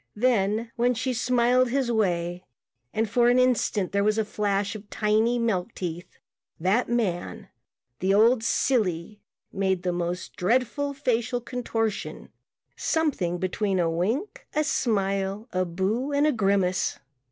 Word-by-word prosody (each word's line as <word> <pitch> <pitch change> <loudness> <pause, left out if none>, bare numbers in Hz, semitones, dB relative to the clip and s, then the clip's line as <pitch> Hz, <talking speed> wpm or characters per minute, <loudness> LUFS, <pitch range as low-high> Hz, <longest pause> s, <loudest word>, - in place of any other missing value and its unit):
Then, 225 -1 +1
when 245 +1 +2
she 255 +2 -1
smiled 245 +1 +2
his 255 -1 0
way 175 -5 0 0.5
and 220 +1 0
for 240 +3 +3
an 245 - +4
instant 245 -6 +2
there 200 0 +1
was 215 +1 +2
a 220 - +1
flash 205 -1 -1
of 215 -1 -10
tiny, 220 +3 +1
milk 225 -3 -1
teeth, 175 -1 -6 0.4
that 190 +9 +1
man, 185 - -2 0.5
the 190 +1 +1
old 225 +4 +4
silly, 210 -5 0 0.3
made 190 -2 0
the 180 -1 0
most 175 +1 -3
dreadful 260 +8 0
facial 245 -2 0
contortion, 230 -3 -3 0.5
something 275 - 0
between 190 +2 -1
a 170 -2 +1
wink, 220 - -2
a 305 - +3
smile, 200 -5 -1
a 185 0 0
booh 215 +11 -1
and 290 - +4
a 305 - +4
grimace. 195 -5 +1
215 Hz, 140 wpm, -26 LUFS, 190-245 Hz, 0.5 s, an